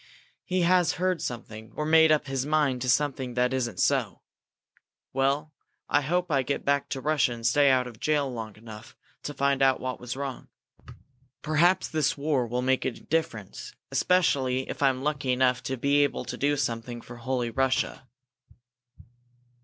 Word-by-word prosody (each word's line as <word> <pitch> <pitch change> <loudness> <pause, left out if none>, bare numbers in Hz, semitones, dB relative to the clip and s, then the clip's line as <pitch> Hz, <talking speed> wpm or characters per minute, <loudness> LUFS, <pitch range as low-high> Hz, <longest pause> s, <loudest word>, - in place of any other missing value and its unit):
"He 185 -1 -1
has 175 -1 +3
heard 185 -2 -1
something, 110 -2 -7
or 150 - -2
made 160 0 +5
up 155 - +2
his 135 -2 -2
mind 145 -4 +1
to 125 - -1
something 130 -2 0
that 125 +1 +1
isn't 120 -4 -2
so. - - 0 0.9
Well, 140 +3 0 0.4
I - - +3
hope 175 +4 -1
I 135 -2 +3
get 135 +2 -3
back 140 0 +1
to 135 - -4
Russia 145 -3 +1
and 115 -1 -8
stay 140 +4 +4
out 130 -1 +3
of 120 -3 -10
jail 150 -2 +1
long 110 -3 -6
enough 110 -1 -12 0.3
to 145 - -6
find 140 0 +1
out 135 -1 +4
what 130 0 -4
was 125 +1 -6
wrong. 135 -2 -5 1.0
Perhaps 170 +4 +3
this 155 -3 0
war 140 -4 0
will 125 +2 -2
make 130 0 +1
a - - +1
difference, 130 - -4 0.2
especially 135 -8 +1
if - - -6
I'm 135 -1 +2
lucky 145 -3 -1
enough 125 -1 +2
to 130 - -2
be 140 +3 +3
able 145 - -1
do 145 +1 -1
something 120 -2 -3
for 120 +1 -11
'Holy 120 0 -2
Russia'." 130 +1 -1
135 Hz, 170 wpm, -27 LUFS, 125-150 Hz, 1.0 s, made